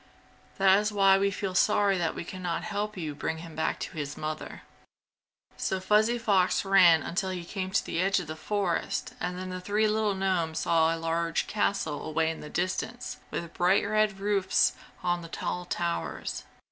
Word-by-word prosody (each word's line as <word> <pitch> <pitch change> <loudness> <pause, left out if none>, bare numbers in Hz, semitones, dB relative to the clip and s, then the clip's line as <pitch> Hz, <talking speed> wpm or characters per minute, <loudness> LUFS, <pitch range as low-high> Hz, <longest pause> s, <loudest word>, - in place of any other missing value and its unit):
That 195 0 +5
is 210 0 -1
why 195 -1 +5
we 200 0 +2
feel 195 -1 -3
sorry 200 +1 +3
that 165 -2 -1
we - - -4
can 185 +2 -8
not 175 -2 -2
help 210 0 -3
you 155 -4 -3
bring 150 +2 -3
him 165 0 -10
back 160 - -1
to - - -5
his 145 -1 -4
mother." 155 0 -5 0.9
So 190 - -1
Fuzzy 215 +5 +3
Fox 195 -5 +2
ran 180 -4 +6
until 190 +2 -2
he 180 -2 -4
came 185 +1 -4
to 190 - +1
the 170 - -1
edge 195 +1 +2
of 180 - -5
the 155 +1 -6
forest 190 +1 -2
and 180 0 -3
then 185 0 -5
the 185 0 -5
three 210 +3 +1
little 215 -1 +1
gnomes 180 -4 0
saw 165 0 +3
a - - -6
large 165 0 -1
castle 200 -7 -1
away 160 +1 0
in 160 - -7
the 150 - -8
distance 185 +8 -3
with 170 -1 -5
bright 185 +3 +3
red 215 -1 +1
roofs 195 -1 +2 0.3
on 175 0 0
the 165 - -8
tall 180 +1 -3
towers. 170 -1 -3
185 Hz, 190 wpm, -28 LUFS, 165-200 Hz, 0.9 s, ran